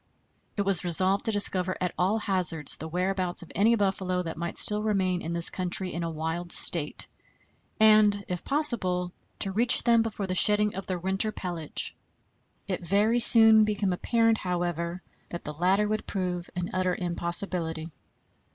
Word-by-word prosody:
It 200 - 0
was 195 -3 0
resolved 185 +3 +1
to 225 - +1
discover 185 -3 +1
at 180 -1 -3
all 190 +5 0
hazards 180 -8 -2
the 160 - -8
whereabouts 180 +1 -3
of 170 - -14
any 220 +4 +2
buffalo 190 -3 -2
that 165 - -6
might 170 +1 -6
still 210 0 +2
remain 190 -4 -1
in 165 - -6
this 170 0 +1
country 185 0 -1
in 170 - -5
a 165 - -3
wild 165 +2 -5
state, 155 -4 +2 0.7
and, 215 -2 +4
if 180 -1 -5
possible, 205 -12 +1 0.3
to 195 - -3
reach 240 +5 +2
them 235 -1 +3
before 220 -3 -4
the 185 - -4
shedding 210 +2 +3
of 195 - -8
their 185 - -3
winter 190 +4 -1
pelage. 175 -6 -5 0.7
It - - -4
very 205 +7 +1
soon 225 -2 +9
became 205 -3 -1
apparent, 225 +4 0
however, 175 0 -4 0.3
that 170 - -8
the 150 - -7
latter 190 +6 0
would 215 0 -4
prove 180 -3 -4
an 180 0 -5
utter 185 -1 -1
impossibility. 170 -2 -3
185 Hz, 165 wpm, -26 LUFS, 175-210 Hz, 0.7 s, soon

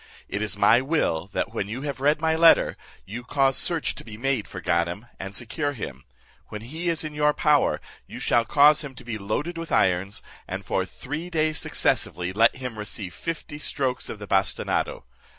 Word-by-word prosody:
It 105 - -3
is 105 -1 -2
my 115 +4 +5
will, 135 - 0
that 115 - -2
when 100 -3 -2
you 120 +6 -5
have 140 -3 -4
read 150 +3 +3
my 160 0 +2
letter, 165 0 +6 0.3
you 120 +5 -6
cause 135 +1 +2
search 170 -3 +2
to - - -10
be 110 -2 -10
made 130 -2 -1
for - - -7
Ganem, 85 +5 0
and 95 +1 -6
secure 145 +7 -2
him. 70 - -7 0.4
When 105 - -7
he 160 +9 -4
is 165 -2 0
in 155 -1 -5
your 150 0 +2
power, 150 -2 +3 0.3
you - - -8
shall 120 - +3
cause 150 +5 +5
him 140 -3 -8
to 125 - -11
be 115 -3 -5
loaded 145 - -2
with 165 - -6
irons, 95 +2 +2 0.2
and - - -5
for - - 0
three 155 +6 -6
days 155 -2 0
successively 90 +1 0
let 115 +3 +4
him 125 -4 -6
receive 105 -3 -5
fifty 150 - -5
strokes 130 -4 -1
of - - -5
the 105 - -8
bastinado. 95 -4 +1
125 Hz, 195 wpm, -25 LUFS, 105-150 Hz, 0.4 s, letter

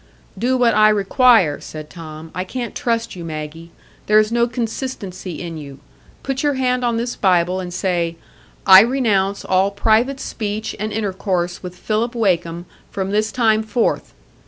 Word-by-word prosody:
"Do 255 +2 0
what 245 -2 +3
I 215 0 +6
require," 210 - +4
said 155 -1 -9
Tom. 160 -1 -10
"I 185 - -2
can't 240 +5 -5
trust 230 -2 -2
you, 175 - -7
Maggie. 160 +1 -7 0.4
There 215 - +5
is 215 0 +3
no 235 0 +2
consistency 225 - -5
in 165 -2 -6
you. 140 -2 -10 0.5
Put 270 0 -2
your 290 -2 +1
hand 250 -1 0
on 235 -1 +1
this 240 +1 -2
Bible, 180 -1 +2
and 180 -1 -5
say, 175 -2 -1 0.5
'I 190 0 +10
renounce 210 -5 +1
all 190 +1 +2
private 225 +6 +1
speech 215 -3 -4
and 215 +1 -3
intercourse 190 -4 -2
with 180 -1 -8
Philip 225 +5 -1
Wakem 175 -6 0 0.2
from 195 0 -3
this 215 +1 +1
time 220 -3 +2
forth. 220 +2 -1
205 Hz, 160 wpm, -19 LUFS, 180-235 Hz, 0.5 s, I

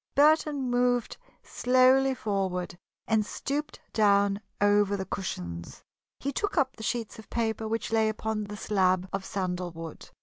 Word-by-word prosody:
Burton 295 -2 +4
moved 245 -1 +1 0.3
slowly 255 +1 +4
forward 190 -6 -2 0.3
and 220 -1 +3
stooped 285 +7 -4
down 200 -1 +3 0.2
over 205 0 +3
the 190 - -3
cushions. 85 - -5 0.4
He 280 - -2
took 405 +7 -2
up 265 -3 +2
the - - -11
sheets 225 -1 -3
of 220 - -13
paper 225 -1 -1
which 225 +1 -2
lay 220 -1 +3
upon 215 0 -2
the 210 +1 -7
slab 185 -3 +1
of 195 0 -2
sandalwood. 180 -4 -4
215 Hz, 140 wpm, -28 LUFS, 195-250 Hz, 0.4 s, Burton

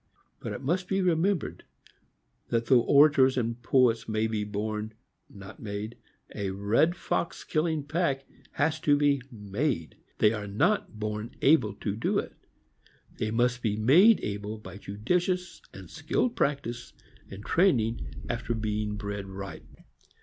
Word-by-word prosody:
But 130 - -6 0.2
be 190 - 0
it - - +2
remembered, 180 0 0 0.8
that 115 0 0
though 125 -2 +5
orators 140 -1 +5
and 115 0 -2
poets 115 -2 +2
may 110 0 +1
be 110 -2 -1
born, 105 +1 -4 0.3
not 100 -1 -12
made, 105 +2 -5 0.4
a 100 -1 -3
red 105 - +2
fox 170 - -2
killing 155 -1 0
pack 145 -3 -1 0.3
has 155 +2 0
to 145 -2 +3
be 145 -2 +2
made; 105 - -3 0.2
they 105 +1 +4
are 105 -2 -4
not 110 - 0
born 105 +2 -4
able 155 +4 +4
to 100 -2 -3
do 115 - 0
it. - - -3 0.9
They 110 - -1
must 125 +2 +1
be 110 -3 0
made 165 - +6
able 105 +1 -4
by 95 -3 -10
judicious 175 - -2
and - - -11
skilled 245 -1 -1
practice 135 - -2 0.4
and 100 +2 -10
training 125 - +2 0.2
after 120 0 -2
being 105 -1 -2
bred 100 -1 -5
right. 95 0 -7
115 Hz, 140 wpm, -28 LUFS, 105-145 Hz, 0.9 s, made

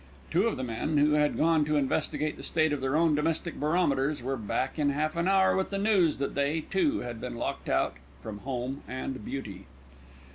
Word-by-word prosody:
Two 185 +7 +3
of 230 - -1
the 130 - -3
men, 125 +6 -1
who 145 +1 +4
had 150 0 +2
gone 160 -1 +3
to 150 0 0
investigate 150 +2 0
the - - -10
state 155 -2 +1
of 145 - -2
their 135 +2 0
own 165 0 +4
domestic 160 +3 -1
barometers, 150 -4 +1
were 135 +2 -1
back 130 +5 -2
in 145 -1 +3
half 155 +3 -1
an 170 +1 0
hour 190 -1 +4
with 190 - 0
the 200 - -2
news 195 -6 +3
that 140 - -2
they 140 +3 0
too 195 - 0
had 120 -2 -6
been 125 -1 -5
locked - - -4
out - - +1 0.3
from 105 -2 -6
home 130 +2 -4
and 130 -2 -5
beauty. 100 -7 -6
150 Hz, 210 wpm, -29 LUFS, 130-165 Hz, 0.3 s, who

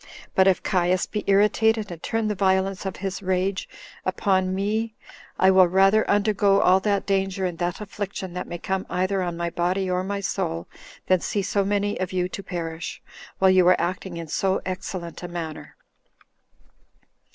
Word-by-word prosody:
But 190 0 +4
if 190 - +3
Caius 180 0 +1
be 210 - -4
irritated, 210 +1 +3
and 165 -2 -8
turn 225 -1 -1
the 210 - 0
violence 190 0 +1
of 190 - -4
his 195 +1 -4
rage 190 0 -1 0.3
upon 185 0 +1
me, 215 +3 -1 0.4
I 190 0 +5
will 185 -1 +6
rather 195 +4 +4
undergo 205 -1 +3
all 185 +1 +5
that 200 0 0
danger 195 -1 0
and 175 -2 -4
that 175 0 -2
affliction 200 -3 -5
that 180 - -5
may 175 - -5
come 190 +2 -3
either 185 +1 0
on 175 -2 -3
my 170 0 -2
body 185 +2 0
or 180 0 0
my 200 +1 -3
soul, 85 - -2 0.4
than 185 -1 +3
see 200 +3 -2
so 200 +1 +1
many 205 +1 0
of 185 -1 -2
you 180 -1 +1
to 195 - -6
perish, 165 -3 -5 0.4
while 190 0 +5
you 185 -1 +5
are 185 - +5
acting 180 0 -3
in 165 -1 -6
so 190 +5 0
excellent 185 -2 -5
a 175 - -5
manner. 170 -3 -6
190 Hz, 175 wpm, -24 LUFS, 180-200 Hz, 0.4 s, will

